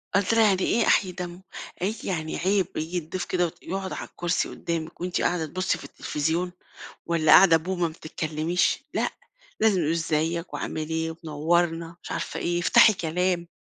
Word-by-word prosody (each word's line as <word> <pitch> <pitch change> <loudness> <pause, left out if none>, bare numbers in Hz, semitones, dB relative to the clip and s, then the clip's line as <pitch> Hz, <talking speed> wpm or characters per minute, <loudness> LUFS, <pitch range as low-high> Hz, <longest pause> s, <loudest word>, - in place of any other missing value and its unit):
قلت 200 +2 +2
لها 225 0 +5
"يعني 195 -3 +3
إيه 235 - +2
أحييِ 185 - +3
دمه؟" 180 0 -7 0.4
قالت 205 +5 -2
لي: - - -4
"يعني 160 -3 -3
عيب 190 0 +1
ييجي 160 +3 -2
الضيف 175 +2 -4
كده 180 -1 +1
وت 165 - -6
يقعُد 190 +2 -4
على - - -6
الكرسي 175 0 -1
قدامِك، 165 -1 -5
وأنتِ 180 0 -1
قاعدة 175 -2 +1
تبُصِّي 185 +5 -1
في - - -12
التليفزيون، 165 +4 -2 0.6
والّا 165 -2 +3
قاعدة 175 -4 +8
بومة 175 +2 -3
ما - - -9
بتتكلَّميش، 155 +2 -1
لأ، - - +1 0.5
لازم 210 -4 +4
نقول 155 -1 +1
إزيِّك، 165 +1 -1
وعامِل 155 -1 -4
إيه، 160 0 -1
ومنوِّرنا 165 +2 0
مش - - -9
عارفة - - -4
إيه، 175 0 0
افتحي 225 +4 +6
كلام." 175 +1 -1
175 Hz, 175 wpm, -26 LUFS, 160-185 Hz, 0.6 s, قاعدة